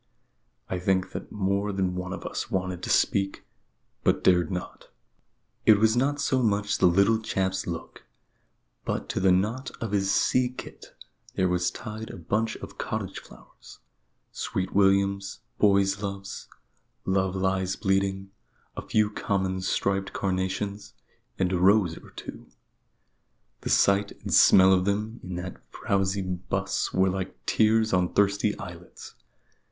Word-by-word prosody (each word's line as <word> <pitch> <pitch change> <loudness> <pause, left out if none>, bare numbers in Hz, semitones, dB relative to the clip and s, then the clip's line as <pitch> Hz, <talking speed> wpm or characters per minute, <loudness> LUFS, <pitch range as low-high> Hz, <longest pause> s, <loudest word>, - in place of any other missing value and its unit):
I 90 - -3
think 95 0 0
that - - -7
more 100 0 0
than 95 -2 -1
one 90 0 -4
of 95 - -6
us - - -4
wanted 95 -1 -2
to - - -5
speak, 95 0 +1 0.6
but - - +2
dared 90 -3 +4
not. 90 -1 -6 0.7
It 110 - +6
was 110 +2 +3
not 140 +4 +1
so 130 -2 +1
much 105 -3 +1
the - - +6
little 100 +5 +4
chap's 95 -3 -1
look. 85 -2 -6 0.8
But - - -3
to - - -1
the 95 0 +4
knot 110 +8 0
of 115 -3 -4
his 95 -1 +1
sea 125 -1 +2
kit 125 - -11 0.4
there 95 - +2
was 90 -1 +1
tied 110 +1 -7
a - - -8
bunch 110 +6 -1
of - - -10
cottage - - -4
flowers - - -16 0.5
sweet 95 0 -3
williams, 100 0 +2 0.2
boy's 100 -1 +3
love, 100 -1 -4 0.8
love 95 0 0
lies 95 0 0
bleeding, 95 -1 -1 0.4
a - - -4
few 110 -1 +2
common 95 -2 -1
striped 95 +1 -1
carnations, 100 +2 -3 0.4
and 95 -1 +1
a 90 - +1
rose 95 -2 +4
or - - -16
two - - -9
and - - -32 1.0
the - - -5
sight 100 +1 +3
and - - -3
smell 95 0 +7
of 90 -1 +2
them 105 +3 -2
in 90 -1 -6
that 90 +1 -6
frowsy 95 0 -1
'bus 90 -1 -2
were 95 0 +2
like 95 0 -6
tears 110 0 +3
on 90 -1 +2
thirsty 100 +1 +2
eyelids. 90 -3 -10
95 Hz, 145 wpm, -26 LUFS, 95-105 Hz, 1.0 s, smell